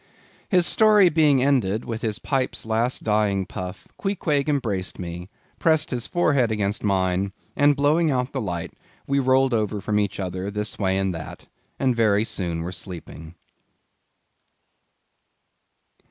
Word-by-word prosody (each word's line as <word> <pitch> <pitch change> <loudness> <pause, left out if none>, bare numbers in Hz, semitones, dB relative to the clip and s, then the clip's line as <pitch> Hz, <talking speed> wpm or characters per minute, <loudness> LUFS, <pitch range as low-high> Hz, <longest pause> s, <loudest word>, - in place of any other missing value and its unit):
His 180 -4 +4
story 210 -3 +5
being 150 -5 +3
ended 115 -6 +1
with 115 -1 -4
his 110 -3 -1
pipe's 135 -4 -2
last 115 +3 0
dying 105 -3 +1
puff, 90 +1 -7
Queequeg 155 -8 0
embraced 110 -10 -1
me, 90 0 -7 0.3
pressed 160 -1 +2
his 120 -3 -3
forehead 140 -9 +2
against 105 -1 -1
mine, 95 -1 0 0.2
and 145 0 +4
blowing 150 +3 +2
out 125 -1 -1
the 135 - -3
light, 85 -5 -4 0.3
we 140 0 +1
rolled 130 0 +3
over 105 -2 0
from 105 +2 0
each 100 -1 -2
other, 95 +1 -3
this 105 +1 -4
way 95 -2 +1
and 95 -1 0
that, 80 -2 -8 0.3
and 130 -3 +1
very 105 -2 +3
soon 85 -6 -3
were 90 - -4
sleeping. 85 -3 -9
110 Hz, 140 wpm, -23 LUFS, 95-140 Hz, 0.3 s, story